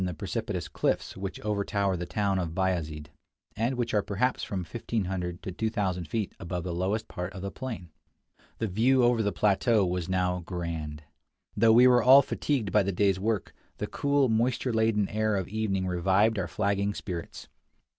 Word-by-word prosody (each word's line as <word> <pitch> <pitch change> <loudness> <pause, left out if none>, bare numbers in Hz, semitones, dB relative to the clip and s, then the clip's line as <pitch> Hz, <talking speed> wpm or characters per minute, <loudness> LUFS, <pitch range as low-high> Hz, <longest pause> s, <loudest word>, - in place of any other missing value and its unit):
the 90 -2 -2
precipitous - - -3
cliffs - - -1
which 95 -1 -5
overtower 100 -2 0
the 90 0 -4
town 100 0 0
of 85 -2 -3
Bayazid, 80 -5 -2 0.4
and 115 +4 0
which 120 -1 -2
are 105 - +3
perhaps 110 +6 -1
from 95 -2 -3
1500 90 -4 -3
to 95 - -4
2000 95 -5 -2
feet 110 +2 -2
above 90 -1 -4
the 90 -1 -3
lowest 100 +6 -1
part 90 +1 -5
of 95 - -8
the 100 - -3
plain. 110 - -6 0.7
The 115 - -1
view 120 +6 +3
over 120 -1 +3
the 105 -1 +1
plateau 105 +1 +2
was 90 -1 -2
now 90 -1 +1
grand. 85 -4 -5 0.5
Though 110 +2 +5
we 120 +2 +7
were 125 -1 +6
all 135 +4 +8
fatigued 125 -9 -1
by 105 - +4
the 100 0 -1
day's 95 0 +2
work, 105 -1 -1 0.2
the - - -2
cool, 140 -1 +1
moisture 120 +2 +1
laden 110 -2 +2
air 110 0 0
of 95 -3 -2
evening 100 -3 -1
revived 95 +4 +2
our 90 - -2
flagging 100 +2 0
spirits. 85 -4 -6
100 Hz, 175 wpm, -28 LUFS, 90-110 Hz, 0.7 s, all